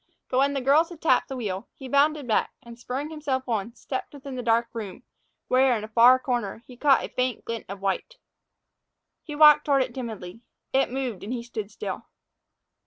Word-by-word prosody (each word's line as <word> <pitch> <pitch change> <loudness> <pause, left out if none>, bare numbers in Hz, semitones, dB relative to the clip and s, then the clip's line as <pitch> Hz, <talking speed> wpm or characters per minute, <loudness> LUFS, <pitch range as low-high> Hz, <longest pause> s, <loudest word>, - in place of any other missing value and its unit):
But 255 - +1
when 280 +1 +2
the 275 - -1
girls 290 +6 +4
had 345 -3 -11
tapped 260 -7 +2
the 270 - -4
wheel, 200 -3 -4
he 265 - -9
bounded 285 +1 +2
back 220 - +1
and, 235 0 -12
spurring 270 +6 -4
himself 275 -4 -3
on, 230 0 -2
stepped 260 +3 -6
within 275 -1 -8
the 250 - -3
dark 235 0 +2
room, 220 -1 -7 0.4
where, 255 -1 +4
in 215 - -6
a - - -5
far 235 +3 +6
corner, 240 -4 -3
he 250 - -13
caught 275 +2 +3
a - - -9
faint 255 -1 -2
glint 230 -1 -5
of 195 0 -7
white. 200 - -2 1.1
He 300 - -8
walked 300 -1 +7
toward 275 -2 +3
it 255 -2 -8
timidly. 225 -5 -7 0.3
It 270 +1 +3
moved, 255 -6 -3
and 210 - -6
he 245 -2 -3
stood 220 -4 -6
still. - - -6
255 Hz, 200 wpm, -25 LUFS, 230-275 Hz, 1.1 s, walked